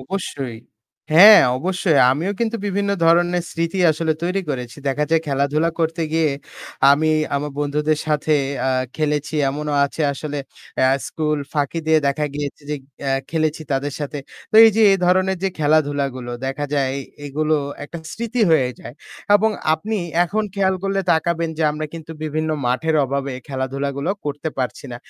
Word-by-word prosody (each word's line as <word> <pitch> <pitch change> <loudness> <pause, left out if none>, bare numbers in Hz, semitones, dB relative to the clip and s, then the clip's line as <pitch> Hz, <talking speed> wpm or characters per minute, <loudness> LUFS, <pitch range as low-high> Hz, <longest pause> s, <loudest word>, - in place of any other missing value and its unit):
অবশ্যই। 135 -5 -5 0.6
হ্যাঁ, 205 +5 +10 0.2
অবশ্যই। 180 -1 +1
আমিও 165 +9 -1
কিন্তু 230 0 0
বিভিন্ন 200 0 -1
ধরনের 175 +1 +3
স্মৃতি 170 +3 -2
আসলে 160 +1 0
তৈরি 180 +3 0
করেছি। 125 -4 -5
দেখা 145 +2 0
যায় 165 -1 +3
খেলাধুলা 145 +3 +1
করতে 165 +1 0
গিয়ে 160 -2 +2 0.6
আমি 155 +3 +3 0.2
আমার 145 +1 -2
বন্ধুদের 150 +1 0
সাথে 155 0 +1 0.3
আ - - +2 0.3
খেলেছি। 150 -1 -1 0.2
এমনও 150 +1 -3
আছে 145 +3 -3
আসলে 145 +1 -5 0.4
অ্যা 130 - +4 0.2
স্কুল 150 -1 -1
ফাঁকি 145 +2 -1
দিয়ে 160 0 +5
দেখা 150 +2 -1
গিয়েছে 145 0 -5
যে 150 - 0 0.3
অ্যা 135 - 0 0.2
খেলেছি 155 -1 -1
তাদের 140 +1 -1
সাথে। 145 0 -4 0.3
তো - - -11
এই 225 - +7
যে 225 - +4
এ - - +5
ধরণের 185 +1 +2
যে 195 - +2
খেলাধুলাগুলো, 145 -5 0 0.2
দেখা 135 +2 -3
যায় 135 -2 +1
এ - - -4 0.3
এগুলো 155 +2 0 0.3
একটা 170 +3 -8
স্মৃতি 235 +1 -3
হয়ে 135 -6 +4
যায়। 120 - -10 0.4
এবং 220 +2 +1 0.2
আপনি 215 +8 -3 0.3
এখন 215 +5 -1
খেয়াল 190 -1 +2
করলে 195 0 0
তাকাবেন 165 0 0
যে - - 0
আমরা 155 +1 -4
কিন্তু 160 -1 -9
বিভিন্ন 155 +1 -2 0.2
মাঠের 155 +6 0
অভাবে 140 0 -3 0.2
খেলাধুলাগুলো 140 +3 -3
করতে 145 +2 -3
পারছি 130 +2 -3
না। - - -5
155 Hz, 160 wpm, -20 LUFS, 140-170 Hz, 0.6 s, হ্যাঁ